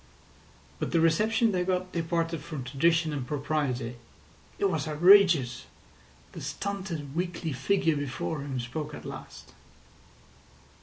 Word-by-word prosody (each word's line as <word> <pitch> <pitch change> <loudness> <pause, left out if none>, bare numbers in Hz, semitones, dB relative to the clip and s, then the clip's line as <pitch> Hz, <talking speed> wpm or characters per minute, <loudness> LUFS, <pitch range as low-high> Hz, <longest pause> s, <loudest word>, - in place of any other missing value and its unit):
But - - -3
the 165 - +4
reception 215 +8 +3
they 180 -2 0
got 185 0 -1
departed 165 -1 -1
from 150 -5 -6
tradition 160 +4 +2
and 135 -4 -4
propriety. 135 -5 -2 0.6
It - - 0
was 155 -2 -1
outrageous. 160 - +5 0.6
The - - -9
stunted, 185 -8 -4
weakly 170 -3 -2
figure 165 +4 +1
before 145 +2 -3
him 135 -2 -4
spoke 150 +5 -5
at - - -10
last. - - -9
160 Hz, 120 wpm, -28 LUFS, 140-180 Hz, 0.6 s, outrageous